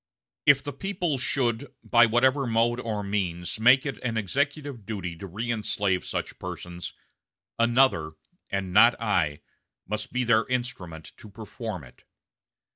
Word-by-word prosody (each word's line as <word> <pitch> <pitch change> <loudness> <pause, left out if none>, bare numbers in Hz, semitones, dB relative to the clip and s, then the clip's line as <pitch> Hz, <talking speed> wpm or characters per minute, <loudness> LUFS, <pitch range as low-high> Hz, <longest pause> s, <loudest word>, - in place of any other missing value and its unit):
If 140 -2 +6
the 145 - -5
people 175 -3 -2
should, 125 0 -1
by 120 -1 +5
whatever 130 +4 +3
mode 115 +1 +2
or 110 -4 -3
means, 95 -2 -2
make 125 +5 +6
it 140 - -4
an 115 -2 -2
executive 140 - -2
duty 95 -5 -5
to 100 - -8
reënslave 105 -2 -1
such - - -4
persons, 90 0 -7 0.6
another, 115 -10 +3 0.4
and 95 -2 -3
not 115 +4 +6
I, 85 -10 0 0.5
must 105 +2 -3
be 125 0 0
their 115 -1 +3
instrument 95 -11 -4
to 110 - -12
perform 110 - -7
it. 60 - -17
115 Hz, 135 wpm, -26 LUFS, 95-125 Hz, 0.6 s, If